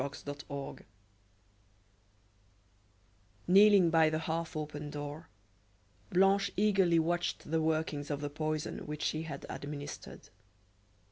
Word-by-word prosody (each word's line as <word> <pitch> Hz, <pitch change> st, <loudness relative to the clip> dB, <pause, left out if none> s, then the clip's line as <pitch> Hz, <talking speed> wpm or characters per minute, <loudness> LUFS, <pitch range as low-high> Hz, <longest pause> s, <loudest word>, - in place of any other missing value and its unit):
CHAPTER 145 Hz, 0 st, -5 dB
XLVI 140 Hz, -1 st, -7 dB, 2.7 s
Kneeling 195 Hz, -2 st, +7 dB
by 160 Hz, -1 st, +5 dB
the 155 Hz, -, -1 dB
half 160 Hz, 0 st, -3 dB
open 150 Hz, -1 st, -5 dB
door, 145 Hz, +2 st, -7 dB, 0.8 s
Blanche 195 Hz, +2 st, +3 dB
eagerly 195 Hz, -4 st, +4 dB
watched 170 Hz, -1 st, -1 dB
the 160 Hz, 0 st, +2 dB
workings 155 Hz, -2 st, -1 dB
of 145 Hz, -2 st, -2 dB
the 145 Hz, 0 st, -4 dB
poison 155 Hz, +1 st, -3 dB
which 150 Hz, 0 st, -5 dB
she 155 Hz, -, 0 dB
had 145 Hz, -4 st, -6 dB
administered. 145 Hz, 0 st, -7 dB
155 Hz, 110 wpm, -32 LUFS, 145-170 Hz, 2.7 s, Kneeling